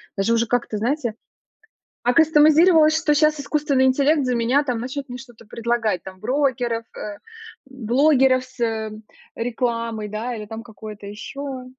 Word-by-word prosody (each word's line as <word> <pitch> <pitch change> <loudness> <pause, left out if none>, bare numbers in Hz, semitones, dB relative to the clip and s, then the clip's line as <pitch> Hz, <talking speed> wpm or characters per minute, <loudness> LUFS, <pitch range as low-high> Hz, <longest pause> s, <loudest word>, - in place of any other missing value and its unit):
даже 195 +3 +1
уже 230 0 +2
как-то, 235 -2 -1
знаете. 240 +1 -1 0.9
Акастомизировалась, 315 +3 +5
что 320 -2 +2
щас 305 0 +2
искусственный 285 -2 +1
интеллект 280 +3 +3
за 250 - 0
меня 245 +5 +2
там 250 -4 -2
начнет 260 +3 -5
мне 245 - -6
что-то 240 -3 -14
предлагать, 225 -4 -1
там 185 -1 -11
брокеров, 245 -2 0
э, 205 -1 -6 0.5
блогеров 265 +1 +2
с, 255 - -21
э, 220 -2 -1 0.4
рекламой, 230 -2 -2
да, 215 +4 -4
или 215 -2 -6
там 225 +2 -8
какое-то 215 -2 -10
ещё. 260 +5 -7
245 Hz, 145 wpm, -22 LUFS, 225-280 Hz, 0.9 s, Акастомизировалась